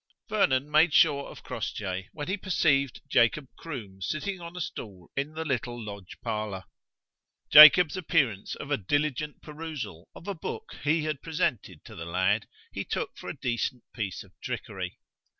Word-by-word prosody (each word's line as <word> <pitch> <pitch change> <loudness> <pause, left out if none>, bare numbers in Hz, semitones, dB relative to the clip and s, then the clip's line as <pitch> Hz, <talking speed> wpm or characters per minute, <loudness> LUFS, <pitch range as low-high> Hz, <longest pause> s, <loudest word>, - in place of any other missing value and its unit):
Vernon 145 -11 +2
made 155 +1 +5
sure 140 -3 +4
of - - -12
Crossjay 95 -2 -4
when 145 -2 -6
he 190 - 0
perceived 145 -9 +1
Jacob 130 +2 +3
Croom 110 -12 -8
sitting 180 - -3
on 170 +1 -8
a - - -4
stool 100 - -7
in 140 +3 -2
the 160 0 -3
little 120 -4 -2
lodge 100 -4 -8
parlour. 105 -4 -3 0.9
Jacob's 155 +3 +10
appearance 145 - 0
of 140 - -8
a 145 - +3
diligent 145 +7 -1
perusal 150 - -7
of 170 - -12
a 200 - -1
book 440 - -6
he 155 +2 +2
had 155 -3 -2
presented 155 - -2
to - - -11
the 80 - -7
lad, 95 +5 +1 0.2
he - - -3
took - - -3
for - - -8
a - - -6
decent 120 0 -2
piece 100 -6 -4
of - - -20
trickery. - - -5
140 Hz, 165 wpm, -28 LUFS, 105-160 Hz, 0.9 s, Jacob's